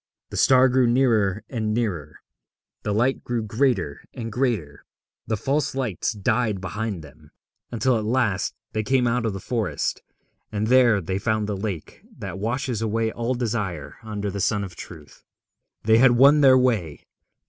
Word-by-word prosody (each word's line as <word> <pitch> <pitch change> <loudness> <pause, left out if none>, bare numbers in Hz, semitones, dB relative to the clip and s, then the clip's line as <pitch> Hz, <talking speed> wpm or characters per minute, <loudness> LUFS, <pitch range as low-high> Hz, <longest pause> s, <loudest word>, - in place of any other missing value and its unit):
The - - -5
star 130 0 +6
grew 130 -1 +3
nearer 115 -5 +2
and 110 -4 -2
nearer, 85 -10 -3 0.6
the 105 - -2
light 120 +6 +1
grew 120 -2 -2
greater 110 - 0
and 115 -2 -5
greater, 105 - -2 0.4
the 110 0 -1
false 140 +5 -1
lights 120 -6 -1
died 105 0 0
behind 95 -1 -4
them, 75 +1 -16 0.4
until 120 +2 +1
at - - -4
last 110 -4 0 0.2
they 110 - 0
came 125 +3 +1
out 120 -1 +1
of 105 - -2
the 95 - -5
forest, 105 -9 -2 0.5
and 105 0 -1
there 120 -3 +4
they 95 +3 -3
found 110 0 0
the 105 -1 -3
lake 95 -5 -5 0.2
that 95 - -6
washes 120 +1 -2
away 110 0 0
all 120 +3 -2
desire 105 - -3
under 105 -3 -4
the 100 +1 -4
sun 105 +1 +1
of 90 -3 -8
Truth. 80 -5 -12 0.6
They 110 +1 +5
had 130 0 +6
won 140 +5 +6
their 130 -2 +7
way. 110 - 0
110 Hz, 165 wpm, -24 LUFS, 100-125 Hz, 0.6 s, their